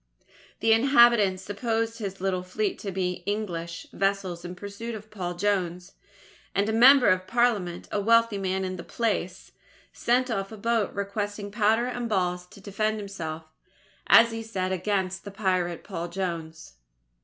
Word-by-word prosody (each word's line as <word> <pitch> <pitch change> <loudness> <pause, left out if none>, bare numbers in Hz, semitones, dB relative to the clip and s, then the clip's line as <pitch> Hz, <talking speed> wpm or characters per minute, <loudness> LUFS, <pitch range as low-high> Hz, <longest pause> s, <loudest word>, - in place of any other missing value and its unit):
The 225 0 +5
inhabitants 235 -6 +5
supposed 225 +3 -2
his 195 -3 -5
little 185 -1 -1
fleet 195 +3 -2
to 200 - -5
be 180 -1 -2
English 170 -5 -3
vessels 195 -3 -1
in 180 0 -7
pursuit 205 +4 -6
of 215 0 -11
Paul 180 -4 -4
Jones; 180 -1 -1 0.6
and 200 +1 +2
a 220 - 0
member 250 +2 +7
of 185 -1 +1
Parliament, 220 -8 0
a 205 - 0
wealthy 230 -1 +3
man 190 0 -1
in 185 0 -4
the 170 - -7
place, 195 -5 -2 0.4
sent 250 +1 +1
off 195 -2 -2
a 220 - -8
boat 225 -1 0
requesting 205 0 -3
powder 220 +2 +2
and 245 -1 -3
balls 180 -3 -1
to 190 - -15
defend 215 +2 -1
himself, 165 -6 -6 0.6
as 230 0 +7
he 225 0 -4
said, 190 -5 -3
against 190 0 -1
"the 200 - -7
pirate 185 -4 -1
Paul 170 +1 -5
Jones." 165 - -5
200 Hz, 155 wpm, -26 LUFS, 185-225 Hz, 0.6 s, member